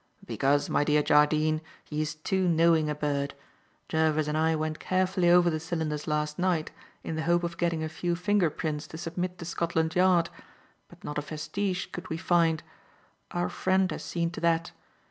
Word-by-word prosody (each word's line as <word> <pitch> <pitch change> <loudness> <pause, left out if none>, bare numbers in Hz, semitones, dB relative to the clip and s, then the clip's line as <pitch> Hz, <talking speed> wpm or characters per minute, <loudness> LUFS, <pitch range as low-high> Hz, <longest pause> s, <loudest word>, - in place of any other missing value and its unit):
"Because, 140 +1 +1
my - - +2
dear 150 0 +3
Jardine, 155 +1 +3 0.2
he 150 0 -3
is 155 +1 -3
too 185 +4 0
knowing 165 -2 +4
a 150 - -1
bird. 145 -1 -2 0.5
Jervis 155 -1 +1
and 150 - -1
I 160 +1 +2
went 155 0 -2
carefully 185 -1 +1
over 175 0 +5
the 155 - -1
cylinders 160 -2 -3
last 150 0 -1
night 175 -4 0 0.3
in 160 - -4
the - - -1
hope 175 +2 +2
of 170 0 -3
getting 170 -2 0
a - - -1
few 170 +2 -2
finger 185 -1 +2
prints 150 0 -4
to 160 - -9
submit 175 +2 -4
to 170 - -7
Scotland 165 -1 -1
Yard; 180 -2 +4 0.6
but - - -18
not 150 0 -3
a - - -2
vestige 180 +6 -3
could 175 +1 -7
we 160 - -2
find. 165 -2 +2 0.7
Our 90 - -1
friend 185 - +1
had - - -4
seen 170 -1 -2
to - - -7
that. 165 0 +1
160 Hz, 185 wpm, -28 LUFS, 155-175 Hz, 0.7 s, over